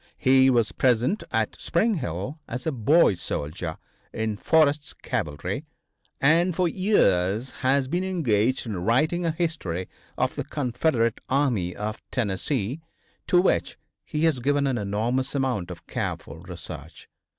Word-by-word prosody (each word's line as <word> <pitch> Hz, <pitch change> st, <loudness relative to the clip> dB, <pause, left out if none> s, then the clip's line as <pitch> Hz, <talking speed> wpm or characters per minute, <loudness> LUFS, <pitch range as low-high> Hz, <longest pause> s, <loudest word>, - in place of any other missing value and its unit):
He 130 Hz, 0 st, +5 dB
was 115 Hz, -6 st, +2 dB
present 125 Hz, -, +2 dB
at 110 Hz, -1 st, -1 dB
Spring 220 Hz, +7 st, +2 dB
Hill 120 Hz, -, -4 dB
as 125 Hz, +2 st, -5 dB
a 160 Hz, -, +1 dB
boy 135 Hz, +2 st, +4 dB
soldier 80 Hz, -1 st, -4 dB, 0.3 s
in 110 Hz, -1 st, -2 dB
Forrest's 150 Hz, +4 st, +2 dB
cavalry, 75 Hz, -1 st, -3 dB, 0.6 s
and 165 Hz, +5 st, +4 dB
for 180 Hz, 0 st, +2 dB
years 120 Hz, -, +2 dB
has 130 Hz, +1 st, +2 dB
been 175 Hz, +6 st, -1 dB
engaged 130 Hz, -, +1 dB
in 100 Hz, -6 st, -4 dB
writing 155 Hz, -, +2 dB
a -, -, +2 dB
history 155 Hz, -, -2 dB, 0.3 s
of -, -, +1 dB
the -, -, -3 dB
Confederate 125 Hz, -3 st, 0 dB
Army 125 Hz, -11 st, +1 dB
of 105 Hz, +1 st, -4 dB
Tennessee, 120 Hz, -, -1 dB, 0.5 s
to 180 Hz, -, +5 dB
which 180 Hz, -, +1 dB, 0.3 s
he 150 Hz, +1 st, -3 dB
has 160 Hz, -6 st, +3 dB
given 140 Hz, +3 st, +1 dB
an 130 Hz, -4 st, 0 dB
enormous 115 Hz, +7 st, -1 dB
amount 130 Hz, -10 st, 0 dB
of -, -, -9 dB
careful 80 Hz, -, -4 dB
research. 85 Hz, -3 st, -9 dB
130 Hz, 140 wpm, -25 LUFS, 105-155 Hz, 0.6 s, He